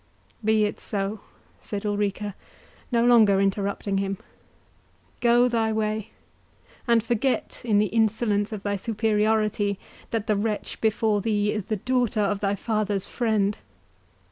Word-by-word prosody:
"Be 215 Hz, 0 st, +3 dB
it 210 Hz, -, -3 dB
so," 200 Hz, +1 st, -3 dB, 0.4 s
said 205 Hz, 0 st, -5 dB
Ulrica, 205 Hz, 0 st, -1 dB, 0.6 s
no 235 Hz, -1 st, +3 dB
longer 220 Hz, -5 st, +6 dB
interrupting 195 Hz, 0 st, 0 dB
him; 195 Hz, 0 st, -2 dB, 1.0 s
"go 240 Hz, +1 st, +4 dB
thy 225 Hz, -2 st, +1 dB
way, 215 Hz, 0 st, -1 dB, 0.8 s
and 230 Hz, -2 st, +4 dB
forget, 240 Hz, +3 st, -1 dB
in 220 Hz, -4 st, +2 dB
the 210 Hz, -, +4 dB
insolence 215 Hz, 0 st, +1 dB
of 210 Hz, -2 st, -6 dB
thy 205 Hz, 0 st, -1 dB
superority, 215 Hz, -1 st, +1 dB, 0.3 s
that 225 Hz, -3 st, -2 dB
the 215 Hz, -, +1 dB
wretch 210 Hz, +1 st, -3 dB
before 220 Hz, -1 st, +2 dB
thee 210 Hz, -1 st, +1 dB
is 210 Hz, -3 st, -3 dB
the 220 Hz, -, -1 dB
daughter 245 Hz, 0 st, 0 dB
of 205 Hz, 0 st, 0 dB
thy 200 Hz, 0 st, 0 dB
father's 210 Hz, -2 st, -1 dB
friend. 215 Hz, -4 st, 0 dB
215 Hz, 135 wpm, -25 LUFS, 205-225 Hz, 1.0 s, longer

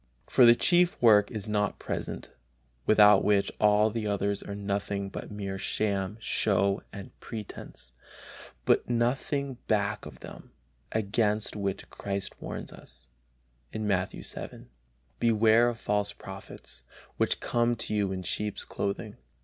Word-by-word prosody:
For 125 Hz, -, +6 dB
the 120 Hz, -, +8 dB
chief 175 Hz, +5 st, +3 dB
work 105 Hz, -3 st, +6 dB
is 110 Hz, -3 st, -4 dB
not 105 Hz, -1 st, 0 dB
present, -, -, -5 dB, 0.6 s
without 105 Hz, -2 st, +7 dB
which 100 Hz, -1 st, +2 dB
all 105 Hz, +1 st, +4 dB
the 110 Hz, -1 st, -3 dB
others 100 Hz, 0 st, -1 dB
are 100 Hz, -, -6 dB
nothing 100 Hz, 0 st, -2 dB
but -, -, -7 dB
mere 100 Hz, -2 st, -5 dB
sham, 100 Hz, -1 st, -1 dB
show 100 Hz, -2 st, +1 dB
and 100 Hz, -2 st, -9 dB
pretence, 105 Hz, -, -8 dB, 0.7 s
with -, -, +2 dB
nothing 130 Hz, +3 st, -1 dB
back 105 Hz, -1 st, 0 dB
of -, -, -13 dB
them; -, -, -11 dB, 0.4 s
against 105 Hz, 0 st, 0 dB
which 100 Hz, -2 st, -3 dB
Christ 100 Hz, -1 st, -4 dB
warns -, -, -6 dB
us, 65 Hz, -1 st, -14 dB, 0.6 s
Matthew 100 Hz, -3 st, -1 dB
vii: -, -, -5 dB, 0.5 s
"Beware 115 Hz, +1 st, +4 dB
of 115 Hz, -2 st, -6 dB
false 105 Hz, -1 st, -1 dB
prophets, 95 Hz, -, -11 dB, 0.4 s
which -, -, +1 dB
come 120 Hz, 0 st, +1 dB
to 115 Hz, -1 st, -4 dB
you 100 Hz, -2 st, +1 dB
in 95 Hz, -1 st, -4 dB
sheep's 105 Hz, +4 st, -3 dB
clothing." 100 Hz, +1 st, -4 dB
105 Hz, 135 wpm, -28 LUFS, 100-110 Hz, 0.7 s, the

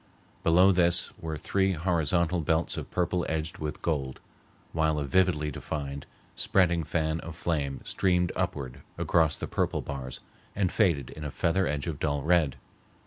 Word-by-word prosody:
Below 90 Hz, +4 st, +6 dB
this 90 Hz, -1 st, +2 dB
were 80 Hz, -4 st, -4 dB
three 95 Hz, +4 st, +1 dB
horizontal 85 Hz, 0 st, +1 dB
belts 80 Hz, +2 st, +1 dB
of -, -, -5 dB
purple 90 Hz, 0 st, 0 dB
edged 80 Hz, +1 st, -2 dB
with 75 Hz, -1 st, -5 dB
gold, 70 Hz, -5 st, -1 dB, 0.5 s
while 80 Hz, -1 st, +2 dB
a 75 Hz, -, -1 dB
vividly 75 Hz, 0 st, +2 dB
defined, 70 Hz, -1 st, -5 dB, 0.3 s
spreading 85 Hz, -3 st, +3 dB
fan 80 Hz, +1 st, -1 dB
of 80 Hz, -1 st, -8 dB
flame 75 Hz, -5 st, -2 dB
streamed 90 Hz, -2 st, +1 dB
upward 65 Hz, -3 st, -3 dB, 0.2 s
across 80 Hz, -3 st, +2 dB
the -, -, -4 dB
purple -, -, -1 dB
bars 65 Hz, -3 st, -6 dB, 0.4 s
and 95 Hz, -3 st, +1 dB
faded 85 Hz, -, +2 dB
in 75 Hz, -, -8 dB
a 75 Hz, -, -3 dB
feather 85 Hz, +6 st, +1 dB
edge 75 Hz, -1 st, -2 dB
of 80 Hz, -4 st, -4 dB
dull 70 Hz, -2 st, 0 dB
red. 80 Hz, -5 st, +3 dB
80 Hz, 155 wpm, -28 LUFS, 75-90 Hz, 0.5 s, Below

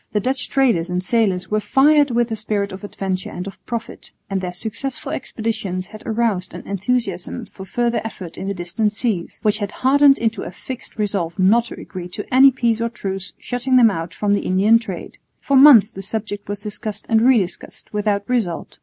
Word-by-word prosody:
The 210 Hz, -, +2 dB
Dutch 255 Hz, +4 st, -1 dB
traders 235 Hz, -11 st, +2 dB
and 180 Hz, +1 st, -1 dB
sailors 195 Hz, -5 st, +1 dB
were 215 Hz, -, +2 dB
fired 290 Hz, +5 st, +4 dB
with 240 Hz, -1 st, +1 dB
the 225 Hz, -, -2 dB
spirit 210 Hz, -2 st, -2 dB
of 190 Hz, +2 st, -9 dB
adventure 190 Hz, -2 st, -4 dB
and 180 Hz, -, -6 dB
of 195 Hz, -, -10 dB
profit, 235 Hz, -1 st, -6 dB, 0.2 s
and 195 Hz, -1 st, 0 dB
their 180 Hz, -1 st, -3 dB
successful 250 Hz, +9 st, -5 dB
expeditions 220 Hz, -, -3 dB
had 215 Hz, +3 st, -12 dB
aroused 220 Hz, -5 st, -1 dB
an -, -, -9 dB
enthusiasm 200 Hz, +1 st, -2 dB
for 190 Hz, -, -11 dB
further 235 Hz, +3 st, 0 dB
effort 190 Hz, -6 st, -7 dB
in 195 Hz, -, -6 dB
the 200 Hz, -, -2 dB
distant 190 Hz, +5 st, -1 dB
seas, 210 Hz, -6 st, -2 dB
which 210 Hz, 0 st, +3 dB
had 205 Hz, -2 st, -3 dB
hardened 275 Hz, +1 st, +4 dB
into 225 Hz, -2 st, -1 dB
a -, -, -5 dB
fixed 245 Hz, +7 st, -8 dB
resolve 195 Hz, -6 st, -1 dB
not 210 Hz, +5 st, +4 dB
to -, -, -8 dB
agree 180 Hz, -2 st, -7 dB
to 205 Hz, +3 st, -6 dB
any 265 Hz, +2 st, +8 dB
peace 235 Hz, -3 st, 0 dB
or 230 Hz, -, 0 dB
truce 195 Hz, -5 st, -5 dB
shutting 245 Hz, +1 st, -1 dB
them 230 Hz, -3 st, +6 dB
out 165 Hz, -2 st, -4 dB
from 205 Hz, -1 st, 0 dB
the 200 Hz, -, +1 dB
Indian 205 Hz, +5 st, +4 dB
trade. 195 Hz, -6 st, -8 dB, 0.2 s
For 280 Hz, -, 0 dB
months 260 Hz, -6 st, +8 dB
the 195 Hz, -, -8 dB
subject 205 Hz, 0 st, -5 dB
was 205 Hz, 0 st, -5 dB
discussed 210 Hz, -1 st, -5 dB
and 225 Hz, -1 st, +3 dB
re 255 Hz, +1 st, +5 dB
discussed 190 Hz, +1 st, -5 dB
without 205 Hz, -1 st, 0 dB
result. 220 Hz, -9 st, -2 dB
215 Hz, 200 wpm, -20 LUFS, 190-235 Hz, 0.2 s, any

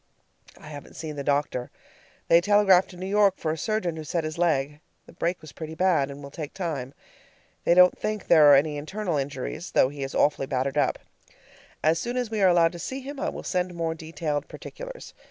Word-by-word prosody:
I 150 Hz, -, -12 dB
haven't 145 Hz, -2 st, -10 dB
seen 155 Hz, -2 st, -6 dB
the 140 Hz, -, -4 dB
doctor. 140 Hz, -3 st, -1 dB, 0.6 s
They 170 Hz, +1 st, +6 dB
telegraphed 195 Hz, -1 st, +4 dB
to 180 Hz, -, -12 dB
New 185 Hz, -, -6 dB
York 200 Hz, -1 st, +3 dB
for 155 Hz, -, -2 dB
a -, -, -2 dB
surgeon, 180 Hz, -2 st, -2 dB
who 160 Hz, -, -5 dB
set 165 Hz, +3 st, -2 dB
his 155 Hz, +1 st, -5 dB
leg. 150 Hz, -4 st, +1 dB, 0.3 s
The -, -, -16 dB
break 175 Hz, +2 st, -2 dB
was 155 Hz, -2 st, -11 dB
pretty 160 Hz, 0 st, -8 dB
bad, 165 Hz, -6 st, +2 dB
and 140 Hz, +1 st, -9 dB
will 140 Hz, -, -9 dB
take 150 Hz, +1 st, -7 dB
time. 145 Hz, -8 st, -4 dB, 0.7 s
They 170 Hz, -, +4 dB
don't 180 Hz, 0 st, +7 dB
think 215 Hz, -2 st, -3 dB
there 155 Hz, -3 st, +7 dB
are -, -, +9 dB
any 145 Hz, +2 st, +2 dB
internal 175 Hz, +3 st, -3 dB
injuries, 140 Hz, +5 st, -4 dB
though 130 Hz, -, +4 dB
he 145 Hz, 0 st, -9 dB
is 135 Hz, 0 st, -4 dB
awfully 145 Hz, -2 st, +2 dB
battered 135 Hz, +1 st, -1 dB
up. 145 Hz, -, +1 dB, 0.9 s
As 160 Hz, +1 st, +3 dB
soon 240 Hz, +6 st, -3 dB
as 245 Hz, -3 st, -2 dB
we 215 Hz, -2 st, -1 dB
are 190 Hz, -, +6 dB
allowed 170 Hz, -2 st, +4 dB
to 175 Hz, -, -9 dB
see 265 Hz, +10 st, -5 dB
him 280 Hz, +1 st, -8 dB
I -, -, -1 dB
will -, -, -7 dB
send 180 Hz, -1 st, -2 dB
more 165 Hz, -1 st, -1 dB
detailed 160 Hz, -2 st, -4 dB
particulars. -, -, -9 dB
165 Hz, 215 wpm, -26 LUFS, 145-185 Hz, 0.9 s, are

